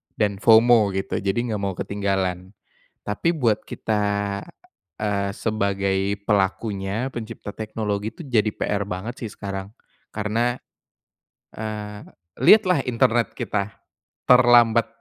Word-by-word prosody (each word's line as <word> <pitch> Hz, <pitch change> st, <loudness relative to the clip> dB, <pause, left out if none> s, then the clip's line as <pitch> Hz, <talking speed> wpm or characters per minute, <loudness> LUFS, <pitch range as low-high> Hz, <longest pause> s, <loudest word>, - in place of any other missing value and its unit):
dan 100 Hz, -3 st, 0 dB
FOMO 110 Hz, -3 st, +5 dB
gitu, 95 Hz, -, -2 dB
jadi 95 Hz, -1 st, -1 dB
enggak 110 Hz, -4 st, -3 dB
mau 100 Hz, -2 st, -2 dB
ketinggalan. 95 Hz, -1 st, -2 dB, 0.5 s
Tapi 165 Hz, +12 st, -1 dB
buat 115 Hz, -7 st, +2 dB
kita, 105 Hz, -2 st, -1 dB, 1.0 s
eee, 100 Hz, -1 st, 0 dB
sebagai 100 Hz, -2 st, -1 dB
pelakunya, 100 Hz, +3 st, -1 dB
pencipta 115 Hz, -2 st, -7 dB
teknologi, 110 Hz, -1 st, -3 dB
itu -, -, -9 dB
jadi 115 Hz, -5 st, +2 dB
PR 100 Hz, -1 st, -2 dB
banget 100 Hz, +6 st, -5 dB
sih -, -, -5 dB
sekarang. 100 Hz, 0 st, -6 dB, 0.4 s
Karena, 115 Hz, +3 st, 0 dB, 1.0 s
eee, 105 Hz, -1 st, -6 dB, 0.4 s
lihatlah 185 Hz, +1 st, +5 dB
internet 120 Hz, -1 st, +1 dB
kita 100 Hz, -1 st, -2 dB, 0.5 s
terlambat, 120 Hz, -2 st, +6 dB
105 Hz, 110 wpm, -23 LUFS, 100-115 Hz, 1.0 s, terlambat